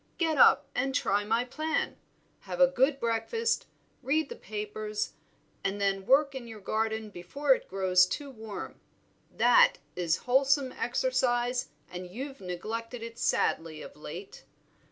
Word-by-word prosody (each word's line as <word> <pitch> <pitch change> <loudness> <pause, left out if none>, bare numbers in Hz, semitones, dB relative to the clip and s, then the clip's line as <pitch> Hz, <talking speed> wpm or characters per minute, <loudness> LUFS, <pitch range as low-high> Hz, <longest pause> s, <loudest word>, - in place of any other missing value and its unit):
Get 325 -2 +1
up - - +7
and 265 +1 -1
try 205 -2 +2
my 225 +3 +1
plan; 310 +5 -2 0.4
have - - -7
a 270 - +9
good 270 +1 +2
breakfast, 235 - 0 0.3
read 280 +3 +1
the - - -6
papers, 210 +1 -4 0.5
and 195 +1 -1
then 195 -1 0
work 280 +1 +4
in 260 -3 -7
your 220 -2 -9
garden 220 +1 -2
before 265 +11 +1
it - - -6
grows 185 -1 +4
too 280 +9 -5
warm; 220 -4 -8 0.5
that - - +6 0.2
is 175 -1 +1
wholesome 270 +1 +3
exercise 245 - 0 0.2
and 180 0 -7
you've 270 +7 -7
neglected 225 +6 -5
it 230 0 -8
sadly 160 -1 0
of - - -11
late." 165 +6 -9
230 Hz, 140 wpm, -29 LUFS, 200-270 Hz, 0.5 s, a